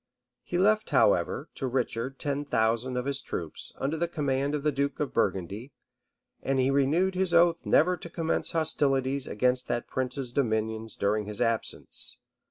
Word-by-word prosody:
He 175 - -3
left 215 +3 +3
however, - - +2
to 135 - -3
Richard 125 +1 -2
ten 145 0 -2
thousand 115 -1 0
of 125 - -2
his 140 0 0
troops, 85 - -4
under 145 +4 -1
the 170 +2 0
command 140 -3 -1
of 145 - -3
the 150 - +2
duke 140 0 -1
of 150 - -2
Burgundy; 100 +8 -1 0.7
and 135 0 0
he 130 +1 +3
renewed 150 +8 +2
his 185 -2 0
oath 170 0 +4
never 180 +3 +4
to 170 0 -10
commence 165 -1 -1
hostilities 140 -4 +1
against 125 +3 +1
that 120 - -1
prince's 130 -1 -3
dominions 110 -3 -1
during 105 +1 0
his 105 0 -6
absence. 115 -2 -1
135 Hz, 165 wpm, -28 LUFS, 120-155 Hz, 0.7 s, oath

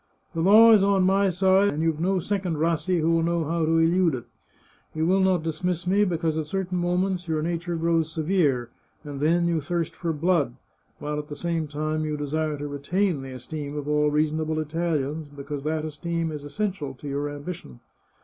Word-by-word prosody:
" - - -41
The 165 - -2
law 215 +6 +8
is 210 -3 +6
on 195 -1 +3
my 195 +1 +3
side, 190 +2 +3
and 155 -2 -2
you've 160 -2 0
no 190 +3 +1
second 185 -2 -1
Rassi 170 +2 +1
who 160 +1 +2
will 165 0 +3
know 170 0 0
how 165 +2 -1
to 165 +1 +2
elude 165 -1 +3
it. 120 - -6 0.7
You 160 0 0
will 190 +3 +3
not 190 -3 +2
dismiss 170 +2 -2
me, 195 +3 +3
be 175 -4 -1
cause 160 -1 -1
at 155 - -4
certain 185 0 -2
moments 180 +1 0
your 155 -1 -1
nature 170 +1 -2
grows 165 -1 +1
severe, 150 -8 +1 0.3
and 145 -2 -7
then 170 +4 +2
you 170 -2 +1
thirst 170 +2 -2
for 170 - -2
blood, 150 -5 +1 0.4
while 150 0 -3
at 150 - -7
the 150 - -7
same 165 -1 -2
time 155 +1 -2
you 150 -1 -2
desire 150 +1 -2
to 145 +1 -5
retain 150 +4 -1
the 135 -1 -8
esteem 145 +3 -6
of 145 -1 -5
all 150 0 +2
reasonable 155 +1 0
Italians, 155 -1 -2
because 145 0 -7
that 155 0 -1
esteem 165 +1 -3
is 150 -2 -6
essential 170 -5 -3
to 145 - -10
your 145 +1 -2
ambition. 145 - -8
160 Hz, 205 wpm, -25 LUFS, 150-180 Hz, 0.7 s, law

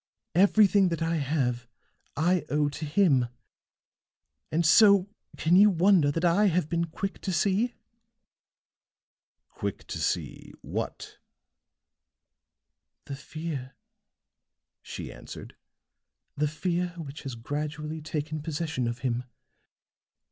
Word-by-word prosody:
Everything 200 +1 +5
that 170 -1 -2
I 165 0 0
have 130 -5 -1 0.5
I 175 +3 +2
owe 150 0 +1
to 150 +2 -6
him. 145 -6 +3 1.2
And 165 +2 +1
so 200 +3 +6 0.3
can 165 +3 +3
you 205 +3 +8
wonder 180 -4 +4
that 165 +5 -1
I 190 +5 +4
have 180 -4 +1
been 170 0 0
quick 195 +4 -5
to 190 - -2
see?" 200 +7 +1 1.7
"Quick - - -5
to - - -5
see - - -3
what?" - - -5 1.9
"The 140 - -6
fear," 140 -3 -6 1.1
she - - -7
answered, - - -10 0.8
"the 150 +1 +1
fear 175 +3 -2
which 150 -4 -7
has 135 -3 -6
gradually 150 +5 -4
taken 155 0 -4
possession 155 -4 -2
of 120 +1 -4
him. 125 0 -1
160 Hz, 110 wpm, -27 LUFS, 145-180 Hz, 1.9 s, you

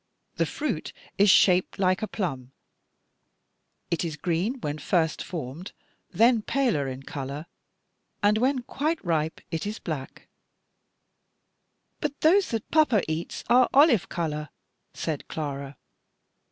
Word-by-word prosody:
The - - +1
fruit 265 - -3 0.3
is 200 +1 +6
shaped 185 -1 +5
like 185 +1 +2
a 215 - -1
plum; 135 - -4 1.4
it 170 - 0
is 160 -3 -4
green 180 - -1
when 150 -3 -3
first 160 +1 +1
formed, 165 +1 -6 0.4
then 230 0 +4
paler 225 - 0
in 130 +1 -6
color; 140 +2 -6 0.8
and 210 +1 +4
when 255 +1 +1
quite 310 +6 -1
ripe, 160 -2 0
it 165 +4 -2
is 215 +2 -4
black." 150 -6 -5
Gen. - - -17
viii. - - -28
9. - - -41 1.8
"But 285 - -29
those 370 +5 +4
that 225 -2 -4
papa 300 -10 +4
eats 160 +2 -4
are 245 +1 +5
olive 270 - +5
color," 150 -3 -3 0.4
said 155 -4 -4
Clara. 140 -2 -5
180 Hz, 135 wpm, -26 LUFS, 150-235 Hz, 1.8 s, is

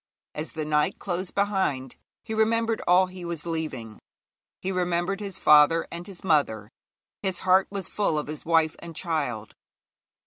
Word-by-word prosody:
As 155 +2 -5
the 155 -1 -3
night 150 0 +1
closed 185 -1 -4
behind 190 -11 0 0.3
he 220 - -5
remembered 225 +1 +1
all 180 +2 +6
he 185 -1 -10
was 170 -2 -4
leaving: 155 -10 -4 0.6
he 190 - -3
remembered 180 +1 0
his 200 -3 -3
father 150 +2 +5
and 170 +1 -7
his 190 -4 -10
mother; 125 - +1 0.5
his 190 -3 -2
heart 190 +1 +4
was 195 -3 -4
full 200 -7 0
of 150 - -1
his 150 0 -7
wife 160 -1 +2
and 170 -1 -10
child. 145 - -2
170 Hz, 160 wpm, -26 LUFS, 150-190 Hz, 0.6 s, all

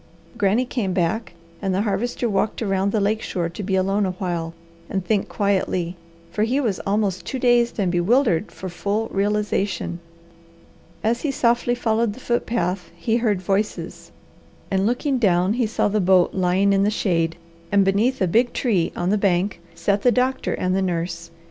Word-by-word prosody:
Granny 205 +5 +2
came 225 -7 -2
back, 180 +4 -1 0.3
and 195 -2 0
the 195 - +1
Harvester 235 +4 -1
walked 215 +2 0
around 195 -1 0
the 215 - +1
lake 210 +2 +1
shore 170 -2 -2
to 170 - -7
be 195 -1 -1
alone 195 +2 +1
a 185 -2 -1
while 170 -3 -3 0.3
and 190 -2 -2
think 210 -1 0
quietly, 185 -3 0 0.4
for 210 - -2
he 240 +6 +2
was 220 -9 -1
almost 195 -3 0
too 260 - -4
dazed 240 -1 +3
and 190 -4 +1
bewildered 195 - +2
for 190 - -7
full 205 +5 -2
realization. 205 -3 -1 1.0
As 230 +2 +1
he 300 - -1
softly 240 -2 +1
followed 225 -2 0
the 250 - -12
foot 240 -2 -1
path 185 -5 -1
he 220 +7 0
heard 210 -6 0
voices, 200 +3 -2 0.6
and 195 +1 +2
looking 255 +3 0
down, 185 -2 +3
he 240 -1 +1
saw 215 - 0
the 210 0 +1
boat 185 -1 +4
lying 190 +2 +2
in 195 - +3
the 200 - +3
shade 165 -6 0 0.4
and 200 -1 +4
beneath 200 +4 +2
a - - +2
big 235 +7 +2
tree 195 -10 +1
on 175 +2 0
the 210 - +2
bank 185 -2 +1
sat 200 +3 0
the 245 - +4
doctor 255 +2 0
and 185 0 0
the 195 - +1
nurse. 170 -2 -2
200 Hz, 180 wpm, -22 LUFS, 185-225 Hz, 1.0 s, boat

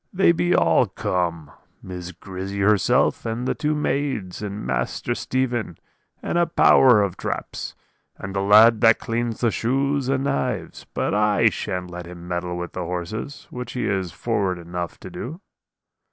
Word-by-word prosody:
They 190 -2 +4
be 175 +1 +2
all - - +4
come 85 -5 -2 0.3
Miss 90 -1 -7
Grizzy 95 +2 -6
herself, 105 -1 +3
and 115 +3 -3
the - - +1
two 150 0 -1
maids, 135 -11 -2
and 105 0 -5
Master - - -1
Stephen, 120 -9 -2 0.5
and 170 - 0
a 170 - +3
power 125 -8 +6
of 95 -2 -3
traps; - - -4 0.4
and 100 0 -7
the 95 - +1
lad 110 +3 +6
that 115 -1 +6
cleans 115 0 -3
the 120 -2 +3
shoes 135 +3 0
and 135 0 +1
knives. 70 - -2
But - - 0
I 105 0 +4
shan't 90 -1 -4
let 90 0 -7
him 85 0 -10
meddle 90 0 -3
with 90 0 -5
the 90 - -3
horses, 90 - -5
which 125 0 -6
he 125 - -2
is 95 -3 -1
forward 100 -3 -1
enough 85 0 -5
to - - -9
do. 155 +8 -6
105 Hz, 165 wpm, -23 LUFS, 90-125 Hz, 0.5 s, power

